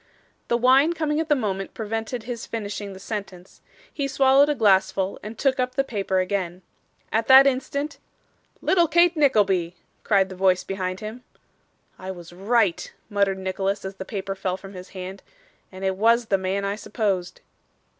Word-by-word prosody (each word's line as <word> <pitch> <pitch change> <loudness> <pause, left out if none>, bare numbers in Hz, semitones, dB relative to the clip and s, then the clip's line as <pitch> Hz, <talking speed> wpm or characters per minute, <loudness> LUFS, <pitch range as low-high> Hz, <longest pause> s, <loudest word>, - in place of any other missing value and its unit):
The 235 - +2
wine 265 +7 +4
coming 310 -2 -1
at 320 0 -2
the 295 - +5
moment 195 -6 -3
prevented 225 +2 -4
his 235 -1 -6
finishing 205 -2 -5
the 190 - -11
sentence. 195 -3 -7 0.3
He 280 -2 -2
swallowed 270 +1 +4
a 295 - +1
glassful 195 -3 +2
and 215 +2 -8
took 270 -2 +1
up 255 0 -1
the 275 - +2
paper 200 -6 -2
again. 185 -1 -2 0.5
At 225 +1 0
that 265 +1 +9
instant 280 +3 -1 0.6
'Little 345 -3 +3
Kate 345 +2 +4
Nickleby!' 200 - +2 0.3
cried 195 -3 +3
the 185 - -8
voice 185 -1 +2
behind 185 -1 -4
him. 220 +4 -7 0.8
'I 185 - -7
was 175 -1 -12
right,' 200 0 +1 0.2
muttered 200 -1 +1
Nicholas 190 +1 -2
as 190 0 -6
the 190 - -5
paper 195 0 -4
fell 190 -1 -3
from 195 +1 -11
his 185 0 -10
hand. 190 +1 -8 0.5
'And 190 0 -6
it 190 0 0
was 230 +4 +3
the 200 -3 +2
man 190 +1 -1
I 200 +1 -2
supposed. 195 -5 -2
200 Hz, 170 wpm, -24 LUFS, 190-255 Hz, 0.8 s, that